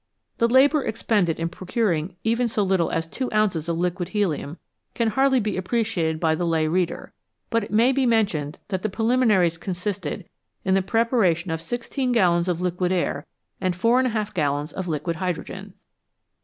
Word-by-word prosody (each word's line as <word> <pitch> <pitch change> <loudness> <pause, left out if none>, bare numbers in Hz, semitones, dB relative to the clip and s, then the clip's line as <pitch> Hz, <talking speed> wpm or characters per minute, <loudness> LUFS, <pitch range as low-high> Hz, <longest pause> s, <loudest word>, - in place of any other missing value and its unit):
The 230 - +4
labour 270 +4 +4
expended 210 -7 0
in 165 - 0
procuring 185 -3 -1
even 235 +2 +1
so 215 -2 0
little 190 -3 +1
as 165 0 -1
2 255 +10 -4
ounces 190 -7 +1
of 165 - 0
liquid 175 0 -1
helium 175 -7 -1 0.4
can 230 -2 +1
hardly 265 +3 +3
be 210 -3 -2
appreciated 185 -5 -1
by 160 -1 +2
the 160 - -2
lay 165 -2 +1
reader,, 175 +1 -1 0.4
but 230 -2 +2
it - - -7
may 230 +5 +4
be 265 -1 +1
mentioned 195 -11 +1
that 190 -2 -2
the 215 - -1
preliminaries 215 -6 +2
consisted 180 -2 -4 0.4
in 190 - +2
the 195 - +3
preparation 190 -5 +1
of 160 0 -2
16 245 - -2
gallons 175 -6 +3
of 175 -2 0
liquid 180 0 0
air 170 -5 -1 0.3
and 185 -1 0
44 230 +2 +2
gallons 145 -3 -1
of 190 -1 -4
liquid 160 +1 -2
hydrogen 180 -1 -5
185 Hz, 170 wpm, -24 LUFS, 170-225 Hz, 0.4 s, The